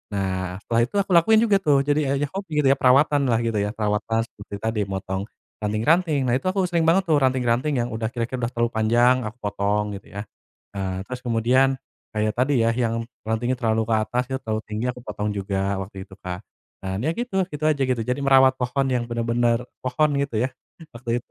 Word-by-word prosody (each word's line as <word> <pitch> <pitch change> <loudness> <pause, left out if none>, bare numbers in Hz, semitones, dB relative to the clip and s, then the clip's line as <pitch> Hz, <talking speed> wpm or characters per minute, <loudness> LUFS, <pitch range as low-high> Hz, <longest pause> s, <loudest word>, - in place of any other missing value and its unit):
Nah, 95 -2 -2
setelah 115 0 +1
itu, - - -13
aku 200 -1 0
lakuin 215 +6 +5
juga 205 -4 +3
tuh. 145 -7 +3
Jadinya 145 -1 +1
ya 145 +1 -2
hob 195 0 -5
gitu 150 -2 0
ya, 135 - +1
perawatan 140 +2 +4
lah, 115 -1 +2
gitu 115 -2 0
ya. 105 +2 -2
Perawatan 110 +1 0
seperti 105 -2 -10
tadi, 110 -1 0
motong 95 +1 -4 0.3
ranting-ranting. 140 - +2
Nah, 120 - +3
itu - - -21
aku 190 +1 +1
sering 170 -2 +1
banget 190 +4 +4
tuh, 155 - +5
ranting-ranting 130 +1 +1
yang 120 - -2
udah 110 0 -2
kira-kira 120 +1 -3
udah - - -8
terlalu 120 0 +1
panjang, 120 +3 +4
aku 115 +4 -9
potong, 105 0 -1
gitu - - -21
ya. 100 - -4 0.5
Ah, 95 -1 -3
terus 125 -1 -6
kemudian 125 +3 +2 0.3
kayak 110 -1 0
tadi 130 +2 +2
ya, 115 - +3
yang 115 -1 -1 0.2
rantingnya 120 +3 0
terlalu 110 -1 +1
ke 115 - +1
atas, 125 +3 -1
gitu, 130 - -2
terlalu 110 -1 -2
tinggi, 105 +2 -4
aku 125 0 -10
potong 105 0 -3
juga, 100 -1 -1
waktu 95 0 -7
itu, 95 - -14
Kak. 90 0 -4 0.4
Dan, 95 +2 -3
ya - - +2
gitu 215 -5 -1
gitu 150 +1 -4
aja, 150 - 0
gitu. 130 -2 0
Jadi, 125 +4 -2
merawat 130 -1 +5
pohon 130 +2 0
yang 125 -2 0
benar-benar 115 0 +1 0.2
pohon, 140 +4 +2
gitu 140 -3 -2
ya, 125 - +1 0.5
waktu 120 0 -2
itu. - - -55
120 Hz, 210 wpm, -23 LUFS, 110-135 Hz, 0.5 s, lakuin